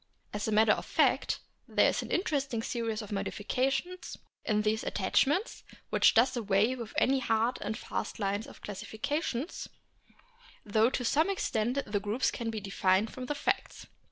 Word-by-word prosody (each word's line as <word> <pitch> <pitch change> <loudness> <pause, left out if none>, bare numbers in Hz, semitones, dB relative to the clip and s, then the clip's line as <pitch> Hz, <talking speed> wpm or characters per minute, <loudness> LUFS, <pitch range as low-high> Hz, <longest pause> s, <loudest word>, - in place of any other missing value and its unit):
As 210 +1 -2
a - - 0
matter 215 0 +5
of - - +1
fact - - +2 0.3
there - - +4
is - - -1
an - - -7
interesting 275 - 0
series 230 -2 -2
of 210 - -10
modifications 265 - -2 0.3
in 210 -1 +1
these 215 +1 +1
attach 195 +6 +2
ments 365 - -1 0.3
which - - +5
does 255 +3 +4
away 215 +1 +2
with 235 -3 -7
any 270 +1 +3
hard 230 0 +1
and 210 +1 -3
fast - - -4
lines 205 +1 -1
of - - -13
classification, 225 - -2 1.2
though 220 +2 +3
to 250 -1 -2
some 315 +9 +3
extent 250 - 0
the 205 -1 -1
groups 210 +6 0
can 230 -1 -3
be 220 -1 -3
defined 195 +1 +1
from 255 -1 -6
the 295 - -1
facts. 385 +7 -2
225 Hz, 165 wpm, -30 LUFS, 210-265 Hz, 1.2 s, matter